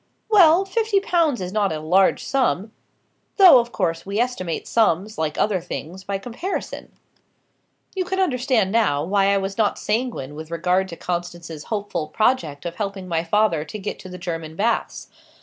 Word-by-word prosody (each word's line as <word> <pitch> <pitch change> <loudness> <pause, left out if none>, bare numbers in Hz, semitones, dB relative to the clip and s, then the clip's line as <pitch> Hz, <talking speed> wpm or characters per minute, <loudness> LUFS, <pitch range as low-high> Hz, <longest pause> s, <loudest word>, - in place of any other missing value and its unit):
"Well, 370 -2 +6
fifty 425 +1 +1
pounds 335 - +1
is 180 +1 -5
not 205 -3 +1
a 155 - -3
large 180 +5 +2
sum. 230 -6 0 0.7
Though, 365 - +9
of 240 0 -3
course, 165 -4 -1
we 200 +1 -4
estimate 230 -9 -2
sums, 210 -2 +1
like 155 -1 -2
other 200 -4 +1
things, 175 +2 -7
by 195 0 -2
comparison. 245 - -5 1.0
You 375 - 0
can 380 +1 -2
understand 250 - +1
now, 200 -11 +2
why 195 +3 +2
I 200 - +3
was 195 +2 -4
not 210 -2 +2
sanguine 215 - -2
with 155 +1 -8
regard 180 +3 +1
to 170 - -8
Constance's 175 -3 -5
hopeful 205 -7 -3
project 165 - 0
of 170 0 -5
helping 195 -2 -4
my 165 -2 -1
father 170 -3 +1
to 160 - -7
get 205 0 -5
to 185 - -10
the 180 - -8
German 165 -3 -5
baths. 225 +6 -1
195 Hz, 170 wpm, -22 LUFS, 170-235 Hz, 1.0 s, Though